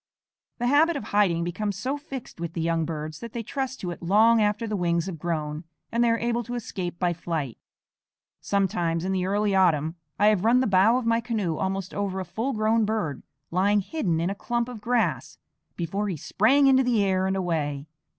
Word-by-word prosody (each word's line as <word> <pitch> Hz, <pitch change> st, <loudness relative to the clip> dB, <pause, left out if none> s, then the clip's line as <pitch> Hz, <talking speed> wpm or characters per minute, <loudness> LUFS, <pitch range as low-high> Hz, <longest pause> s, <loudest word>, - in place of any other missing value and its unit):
The 240 Hz, -, -2 dB
habit 305 Hz, +6 st, +4 dB
of -, -, -5 dB
hiding 185 Hz, -5 st, +2 dB
becomes 195 Hz, +3 st, -3 dB
so 260 Hz, +8 st, -2 dB
fixed 275 Hz, -, -8 dB
with 170 Hz, -1 st, -4 dB
the 170 Hz, -, -3 dB
young 165 Hz, 0 st, 0 dB
birds 155 Hz, -1 st, -5 dB
that 230 Hz, -1 st, -8 dB
they 235 Hz, -, -4 dB
trust 265 Hz, +2 st, -4 dB
to 180 Hz, -, -3 dB
it 175 Hz, -, -8 dB
long 215 Hz, +6 st, +4 dB
after 210 Hz, +2 st, +1 dB
the 215 Hz, -1 st, -2 dB
wings 170 Hz, -3 st, 0 dB
have 180 Hz, -5 st, -6 dB
grown 155 Hz, -2 st, -3 dB, 0.3 s
and 235 Hz, +1 st, +2 dB
they 235 Hz, -, +3 dB
are 230 Hz, -, +2 dB
able 235 Hz, +1 st, 0 dB
to 245 Hz, -, -5 dB
escape 185 Hz, -7 st, -4 dB
by 175 Hz, 0 st, +1 dB
flight. 160 Hz, -7 st, -4 dB, 0.8 s
Sometimes 175 Hz, -4 st, 0 dB
in 190 Hz, -, -1 dB
the 185 Hz, -1 st, 0 dB
early 205 Hz, +1 st, +1 dB
autumn 165 Hz, -4 st, +2 dB, 0.2 s
I 210 Hz, +1 st, +5 dB
have 205 Hz, -3 st, +1 dB
run 235 Hz, +3 st, +5 dB
the 260 Hz, -, +2 dB
bow 200 Hz, +4 st, +4 dB
of 255 Hz, -, -3 dB
my 230 Hz, 0 st, +2 dB
canoe 215 Hz, -9 st, -1 dB
almost 190 Hz, -1 st, -2 dB
over 195 Hz, -2 st, -2 dB
a 185 Hz, -, -4 dB
full 225 Hz, +10 st, -3 dB
grown 220 Hz, +1 st, +2 dB
bird, 205 Hz, -10 st, -2 dB, 0.3 s
lying 200 Hz, +4 st, +3 dB
hidden 190 Hz, -, -1 dB
in 170 Hz, +3 st, 0 dB
a -, -, -1 dB
clump 235 Hz, +3 st, -2 dB
of 245 Hz, -4 st, -8 dB
grass, 240 Hz, +1 st, 0 dB, 0.4 s
before 195 Hz, +5 st, -2 dB
he 180 Hz, -, -3 dB
sprang 230 Hz, -, +3 dB
into 265 Hz, -1 st, +6 dB
the 240 Hz, -5 st, +2 dB
air 190 Hz, -1 st, +1 dB
and 190 Hz, -, 0 dB
away. 150 Hz, -6 st, -2 dB
195 Hz, 210 wpm, -26 LUFS, 170-230 Hz, 0.8 s, into